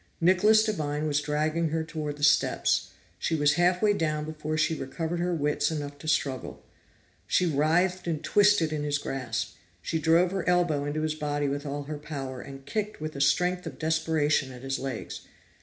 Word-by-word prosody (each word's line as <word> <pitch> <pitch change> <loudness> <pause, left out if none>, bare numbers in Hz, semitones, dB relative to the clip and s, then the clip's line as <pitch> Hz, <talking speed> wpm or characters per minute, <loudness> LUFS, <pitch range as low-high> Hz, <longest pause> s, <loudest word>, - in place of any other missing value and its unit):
Nicholas 200 +5 +5
Devine 150 -8 -1
was 145 -1 +1
dragging 155 +2 0
her 160 +1 -1
toward 155 -2 -5
the 145 - -7
steps; 150 - +3 0.3
she 165 - 0
was 145 -1 +3
half 180 +2 +2
way 210 -1 +5
down 155 -5 -1
before 155 0 -4
she 155 +1 +2
recovered 160 +4 -3
her 175 +1 0
wits 150 -3 +1
enough 145 -2 -5
to 155 - -9
struggle. 135 -4 -1 0.6
She 180 - +2
writhed 175 +4 +1
and 160 -3 -2
twisted 205 -6 +4
in 150 - -2
his 145 -1 0
grasp. 120 -5 -4 0.2
She 160 - -2
drove 165 +3 +3
her 190 -2 -2
elbow 175 -5 +2
into 150 +2 -2
his 155 -1 0
body 145 -1 -2
with 145 +1 -3
all 145 +1 -3
her 150 +1 -6
power, 135 -4 -6
and 135 -1 -10
kicked 210 +7 -3
with 155 0 -4
the 140 - -5
strength 180 +5 +2
of 135 -5 -7
desperation 155 -3 +1
at 125 0 -11
his 135 0 -2
legs. 130 -4 -5
155 Hz, 190 wpm, -27 LUFS, 145-170 Hz, 0.6 s, Nicholas